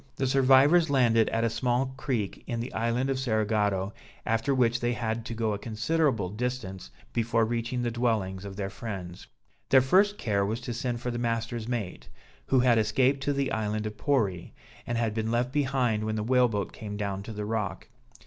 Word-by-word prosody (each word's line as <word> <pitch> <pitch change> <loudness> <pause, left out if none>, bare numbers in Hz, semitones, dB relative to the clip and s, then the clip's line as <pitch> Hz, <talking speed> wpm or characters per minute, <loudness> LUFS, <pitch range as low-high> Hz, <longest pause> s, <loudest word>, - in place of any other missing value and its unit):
The 135 - -1
survivors 135 +5 +5
landed 120 -5 +3
at 115 0 0
a 115 - +2
small 125 +2 0
creek 120 -8 -3
in 120 - -2
the 120 +3 -5
island 115 +4 0
of 130 - -1
Cerigotto, 105 -5 0 0.3
after 115 +5 +1
which 120 -2 +2
they 120 0 0
had 115 0 -2
to 115 - -5
go 115 -1 0
to - - 0
a 100 - -4
considerable 115 - 0
distance 105 - -4 0.2
before 115 -1 +2
reaching 120 +2 -2
the 120 - 0
dwellings 110 -6 -1
of 100 -1 -7
their 100 -1 -4
friends. 95 -5 -7 0.4
Their 135 - +7
first 195 +10 +3
care 100 -4 0
was 110 +4 -1
to 120 -1 -4
send 120 -1 -3
for 125 - -2
the 120 - -3
master's 115 -1 -2
mate, 115 -7 -4 0.4
who 130 -2 +4
had 120 -2 +4
escaped 130 +6 +2
to 145 - +1
the 140 -1 -1
island 110 -1 -1
of 105 0 -4
Pori, 105 -12 0 0.3
and 120 - -1
had 115 -2 0
been 110 0 -2
left 120 +2 0
behind 130 -6 +1
when 110 0 -2
the 105 - -1
whale 125 +2 +4
boat 105 -2 -2
came 105 -1 -6
down 100 -2 -3
to 105 - -8
the 105 -1 -4
rock. 105 -2 -3
115 Hz, 200 wpm, -28 LUFS, 105-125 Hz, 0.4 s, Their